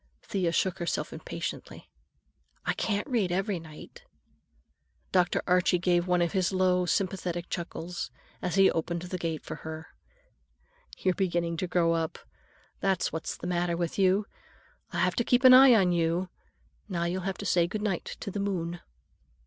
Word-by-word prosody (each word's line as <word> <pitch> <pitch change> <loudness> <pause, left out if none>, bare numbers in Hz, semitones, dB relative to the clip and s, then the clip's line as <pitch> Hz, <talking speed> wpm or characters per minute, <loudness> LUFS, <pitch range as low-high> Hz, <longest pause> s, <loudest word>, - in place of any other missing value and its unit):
Thea 185 -4 -1
shook 185 +1 0
herself 175 - -2
impatiently. - - -6 0.8
"I - - +1
can't 205 +2 -1
read 225 -9 0
every 190 +1 0
night." 160 - -12 1.1
Dr. 180 -1 +2
Archie 180 0 +3
gave 175 0 +1
one 180 -1 +3
of 170 - -1
his 185 -3 +1
low, 185 -1 +2
sympathetic 180 -1 -1
chuckles 175 0 -4 0.3
as 180 -1 -2
he 195 -1 +6
opened 170 +1 -2
the 180 0 -5
gate 165 -2 -3
for - - -6
her. 160 0 -8 1.1
"You're 185 - +1
beginning 175 -3 -1
to 185 - -2
grow 170 -1 +2
up, 165 -1 -2 0.6
that's 190 -2 0
what's 160 - -4
the - - -8
matter 175 -1 0
with 170 +2 -2
you. 195 +2 +3 0.7
I'll - - -1
have 180 0 +2
to 235 - +2
keep 245 +2 +2
an 255 0 +10
eye 260 -1 +9
on 190 -4 +4
you. 170 +2 0 0.6
Now 170 -3 -1
you'll 175 +2 -1
have 190 0 -3
to 205 - -7
say 175 -2 +3
good 210 +4 -4
night 195 -5 -2
to 200 - -4
the 205 - -4
moon." 175 -4 -2
180 Hz, 165 wpm, -28 LUFS, 170-195 Hz, 1.1 s, an